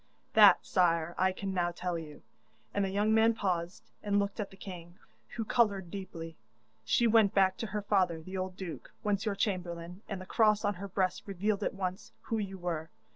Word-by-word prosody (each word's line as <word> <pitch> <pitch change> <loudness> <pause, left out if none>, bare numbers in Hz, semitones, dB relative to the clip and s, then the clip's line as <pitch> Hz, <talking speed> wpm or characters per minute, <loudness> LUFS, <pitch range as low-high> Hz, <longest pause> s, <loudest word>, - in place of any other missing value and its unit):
That, 205 -4 +7
sire, 170 -2 +2
I 190 +1 +4
can 195 +1 -4
now 175 -2 +1
tell 175 0 -3
you,' 155 -3 -8 0.5
and 200 - +1
the 195 - 0
young 205 +3 +2
man 225 +1 +4
paused 180 -4 -2 0.2
and 205 -1 +1
looked 200 +2 -1
at 205 - -2
the 195 - -16
king, 175 -3 -9 0.4
who 225 -2 -2
coloured 200 -7 +1
deeply. 165 -4 -7 0.5
'She 175 - +2
went 220 -3 +4
back 190 -1 +4
to 235 -2 -3
her 210 +1 -3
father 185 -5 +2
the 185 +4 -8
old 185 0 -3
duke, 180 -4 -7
once 205 +1 0
your 205 - 0
chamberlain, 180 -2 -3
and 195 -3 -3
the 185 - -8
cross 215 0 +3
on 205 - +2
her 200 - -4
breast 190 0 -1
revealed 200 +2 -1
at - - -1
once 185 0 -4
who 225 - -2
you 195 -2 -4
were. 165 -3 -3
190 Hz, 200 wpm, -31 LUFS, 175-205 Hz, 0.5 s, That